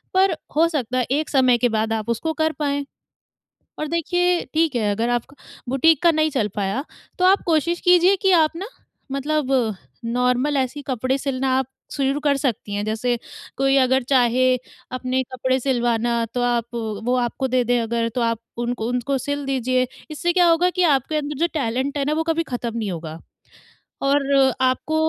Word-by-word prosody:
पर 375 -3 +4 0.2
हो 330 +2 +5
सकता 255 -6 -2
है, 250 - +1
एक 305 +3 0
समय 255 -3 +4
के 245 - +2
बाद 220 0 0
आप 220 0 -3
उसको 320 +8 -1
कर 315 0 +2
पाएँ। 285 -1 -1 0.9
और 305 - -2
देखिए, 355 +2 +1
ठीक 315 -3 +1
है, 215 -3 +1
अगर 225 +4 -1
आपका 245 +3 -2 0.3
बुटीक 290 +3 +3
का 340 - +6
नहीं 310 0 +1
चल 240 -7 0
पाया, 205 +6 -1 0.4
तो 365 - +3
आप 385 +2 +4
कोशिश 335 +2 +1
कीजिए 360 +2 +5
कि 385 - +4
आप 325 -3 +4
ना 365 +4 -5 0.5
मतलब 280 0 -1 0.5
नॉर्मल 250 +4 +1
ऐसी 265 +2 -2
कपड़े 255 +1 0
सिलना 270 -1 -2
आप 265 -1 0 0.3
शुरू 275 0 0
कर 290 -2 +1
सकती 230 -6 -2
हैं। 205 +1 -2
जैसे 240 +3 -1 0.4
कोई 270 0 +3
अगर 260 +1 +2
चाहे, 255 0 +3 0.4
अपने 255 +1 -1
कपड़े 260 +1 0
सिलवाना, 240 -2 0
तो 245 - -1
आप 240 -2 +1 0.4
वो 250 +1 +2
आपको 260 +2 -3
दे 255 0 +1
दें 245 +1 +1
अगर, 230 0 -1
तो 245 +1 -3
आप 230 -1 0 0.3
उनको 235 -2 -2
उनको 250 +3 -1
सिल 285 +2 -3
दीजिए। 255 -1 0 0.2
इससे 345 +3 -1
क्या 355 -1 +4
होगा 340 +2 +3
कि 360 0 0
आपके 305 +4 -4
अंदर 295 -1 -3
जो 340 +2 +2
टैलेंट 270 0 -1
है 275 - 0
ना, 295 - 0
वो 320 +1 0
कभी 330 0 0
खत्म 240 -5 -4
नहीं 215 -4 -2
होगा 160 -2 -6 0.8
और 280 +1 +2 0.4
आपको 260 +4 +1
265 Hz, 185 wpm, -22 LUFS, 240-305 Hz, 0.9 s, का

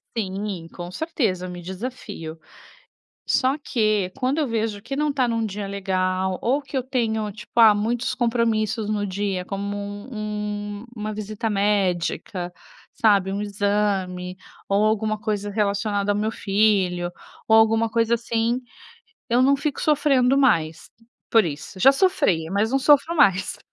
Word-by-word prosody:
Sim, 195 -4 -3
com 175 0 -7
certeza, 210 - -1
me 175 0 -7
desafio. 190 -4 -7 0.9
Só 260 +2 +2
que, 215 -8 0
quando 260 +4 0
eu 300 - +1
vejo 220 -3 -2
que 275 - -5
não 300 +1 +1
está 265 -3 +1
num 230 -1 0
dia 200 0 -5
legal 185 -1 -1
ou 270 +5 +2
que 275 0 -8
eu 260 - +1
tenho 225 -4 -1
tipo, 220 +3 -8
ah, 220 -2 +8
muitos 230 +4 -1
compromissos 230 -2 0
no 210 -1 -1
dia 195 -1 -2
como 200 +1 -4
um 210 0 -5
uma 215 -1 -4
visita 215 +2 -4
médica, 190 -3 0 0.4
sabe, 200 -3 +3
um 200 - -2
exame 200 -3 -1 0.3
ou 200 +2 +3
alguma 215 0 +1
coisa 205 -2 -2
relacionada 205 0 0
ao - - -1
meu 215 +1 0
filho 195 -5 +1 0.4
ou 220 - +6
alguma 225 +1 +4
coisa 230 +1 +2
assim, 235 +1 0 0.7
eu 240 +2 +3
não 275 +2 +5
fico 285 +1 -2
sofrendo 275 -4 +3
mais 165 - +1 0.4
por 225 -2 +5
isso, 155 +4 -6
já 265 +8 +7
sofri 270 - +2
mas 205 +4 +1
não 270 - +2
sofro 295 +4 +4
mais. 200 - +3
210 Hz, 145 wpm, -23 LUFS, 195-235 Hz, 0.9 s, ah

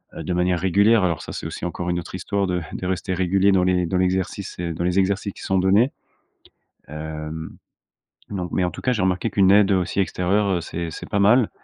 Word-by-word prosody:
heu, - - -6
de 90 - -2
manière 90 0 +1
régulière 100 +4 +4
alors, 85 -4 0
ça, - - -8
c'est - - -6
aussi - - -6
encore 90 0 -4
une 85 0 0
autre 85 - -8
histoire 100 +1 -1
de 90 -1 -1
de 90 - -4
rester 95 0 -2
régulier 95 +2 +2
dans 90 - +3
les 90 -1 +2
dans 90 - -1
l'exercice 95 +1 -1
et 85 -2 -2
dans 85 - -4
les 90 +2 +2
exercices 100 +1 0
qui - - -13
sont 95 - 0
donnés, 100 +8 +3 1.0
hem, 75 +1 -6 0.8
non, 90 -3 -3
mais 95 - 0
en 90 - -2
tout - - -9
cas, 130 - +1
j'ai 110 - -1
remarqué 95 +4 0
qu'une 95 -2 +4
aide 100 0 +5
aussi 95 +1 0
extérieure, 95 +2 0
heu, - - -3
c'est 85 0 -5
c'est - - -8
pas 100 - 0
mal, 110 +3 +4
95 Hz, 225 wpm, -22 LUFS, 90-100 Hz, 1.0 s, aide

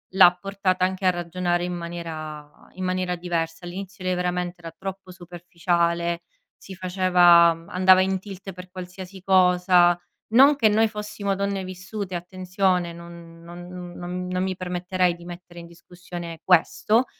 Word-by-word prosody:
l'ha 180 -2 +8
portata 190 -1 0
anche 190 +1 -3
a - - +6
ragionare 175 0 -1
in 180 - -3
maniera 160 -3 -6 0.3
in 185 - -5
maniera 185 -1 -1
diversa. 170 -1 -3
All'inizio 190 +1 -8
lei 185 - +1
veramente 180 0 -2
era 165 - -8
troppo 190 +2 -8
superficiale, 170 -1 -1 0.3
si 190 - -11
faceva 180 -2 +5 0.2
andava 185 0 +5
in 190 0 +1
tilt 195 0 -9
per 180 +1 -11
qualsiasi 185 +1 -9
cosa; 180 -2 +4 0.3
non 270 +6 +6
che 230 -6 +3
noi 220 +1 +3
fossimo 210 -2 -4
donne 200 0 -2
vissute, 185 +1 -6
attenzione, 180 0 -1
non 170 -1 -12
non 175 +1 -10 0.3
non 180 +1 -5
non 180 0 -1
mi 190 0 -2
permetterei 180 0 -1
di 170 0 -14
mettere 175 0 -10
in 170 - -10
discussione 175 -1 -9
questo; 210 +6 +3
180 Hz, 145 wpm, -24 LUFS, 175-190 Hz, 0.3 s, l'ha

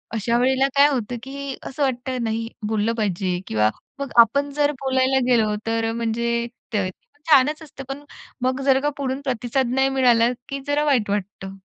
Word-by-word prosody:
अशा 235 +2 +1
वेळेला 265 +2 +3
काय 280 +1 +7
होतं, 245 -3 -2
की 275 0 -6
असं 280 +2 -3
वाटतं 255 -1 -2
नाही 225 0 -2 0.2
बोललं 220 +1 0
पाहिजे 185 -4 -1
किंवा 110 0 +2 0.3
मग 280 -1 -3
आपण 280 +5 +5
जर 295 0 +2
बोलायला 265 0 +2
गेलो, 220 -4 +3
तर 225 0 0
अ, 225 - -2
म्हणजे 235 +1 -1 0.3
ते 195 -3 0 0.4
छानच 300 +2 +5
असतं. 275 -3 -10
पण 280 +2 -6 0.4
मग 255 +1 0
जर 265 -1 +5
का 295 - +1
पुढून 270 0 -2
प्रतिसाद 250 0 0
नाही 265 0 +3
मिळाला, 245 -3 +4 0.2
की 275 0 -3
जरा 290 +1 +1
वाईट 250 -8 +2
वाटतं. 200 -1 -3
255 Hz, 175 wpm, -22 LUFS, 225-275 Hz, 0.4 s, काय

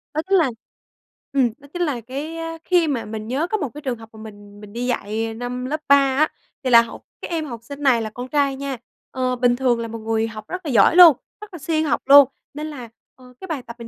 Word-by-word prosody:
Đó 310 - +1
chính 390 - +5
là 315 -7 +2 0.8
ừm, 260 -4 +3
đó 285 -1 -17
chính 355 - -4
là 285 -8 -1
cái 280 +8 -6 0.3
khi 350 -3 +2
mà 260 -6 -2
mình 215 0 -6
nhớ 275 +7 -1
có 430 - -1
một 295 -10 -3
cái 295 - -9
trường 255 -4 -3
hợp 225 0 -13
mà 220 - -13
mình 205 -1 -12
mình 205 -1 -12
đi 240 +2 -3
dạy 225 -1 -2
năm 245 +2 -5
lớp 305 +3 -3
3 280 - +8
á. 275 +2 +2 0.3
Thì 260 - 0
là 235 -1 +8
học 230 - -8 0.2
cái - - -6
em 320 -2 -1
học 235 -5 -7
sinh 280 +4 -9
này 250 -4 +4
là 220 - -4
con 245 +4 -7
trai 280 -2 +1
nha, 275 -2 -4 0.3
ờ, 255 -1 -1
bình 245 0 +2
thường 245 -2 +1
là 230 - -3
một 225 0 -7
người 225 0 -1
học 215 -1 -9
rất 370 -2 -6
là 285 - -2
giỏi 245 - +5
luôn, 340 -7 +9 0.2
rất 425 -3 -11
là 345 - -8
siêng 315 +1 0
học 245 -6 0
luôn. 280 -1 +8 0.2
Nên 300 +2 -5
là, 255 -7 -8 0.3
ờ, 250 -1 -17
cái 380 - -7
bài 315 -7 -3
tập 235 0 -10
mình 230 - -8
255 Hz, 265 wpm, -21 LUFS, 230-295 Hz, 0.8 s, luôn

